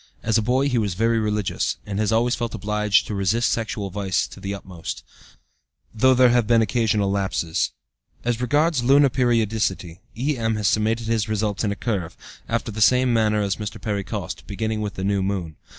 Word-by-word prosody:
As 110 -1 +1
a 115 - +4
boy 130 +5 +1
he 125 -4 +1
was 100 -5 -1
very 115 +3 +2
religious, 105 -2 -1
and 100 -1 -4
has 110 0 +1
always 120 +2 +2
felt 120 -3 -3
obliged 105 0 +1
to - - -5
resist 100 +5 +1
sexual 110 -3 -3
vice 95 -1 0
to - - -12
the 100 - -5
utmost, 95 -4 -7 0.9
though 130 +4 +4
there 125 -1 +5
have 120 -3 +2
been 115 -1 +4
occasional 105 -3 +1
lapses. 95 -4 -1 0.6
As 120 0 0
regards 145 +2 +2
lunar 140 +2 +5
periodicity, 110 -8 0 0.2
E.M., 120 -4 0
has 105 -2 0
summated 110 +2 +1
his 110 -2 0
results 105 -1 -1
in 105 - 0
a - - -2
curve, 100 -7 -3 0.3
after 115 0 -1
the 110 +1 -5
same 125 +2 +4
manner 105 -2 +2
as 100 -2 -1
Mr. 105 -2 -6
Perry 105 -3 -2
Coste, - - -5
beginning 110 +2 -2
with 105 -1 -4
the 95 - -4
new 100 0 +1
moon. 95 -5 -3
110 Hz, 190 wpm, -23 LUFS, 100-120 Hz, 0.9 s, there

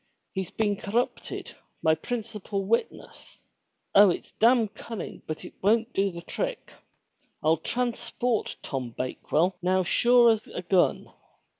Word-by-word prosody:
"He's 190 -2 -3
been 205 -2 0
corrupted, 225 +6 -3 0.3
my 160 -1 +5
principal 210 -1 -4
witness. 230 +4 -3 0.6
Oh 200 0 +8
it's 175 - -3
damn 235 0 +4
cun 225 +2 -8
ning - - -7
but 155 - -5
it - - -10
won't 225 +4 +2
do 195 0 +2
the 170 -2 -8
trick. - - -4 0.7
I'll 160 +1 +4
transport 240 +3 -1
Tom 125 -4 -4
Bakewell 160 +7 0
now 185 +1 +2
sure 240 +5 +5
as 220 -1 -1
a 180 - -6
gun. 180 0 +1
205 Hz, 135 wpm, -27 LUFS, 180-230 Hz, 0.7 s, Oh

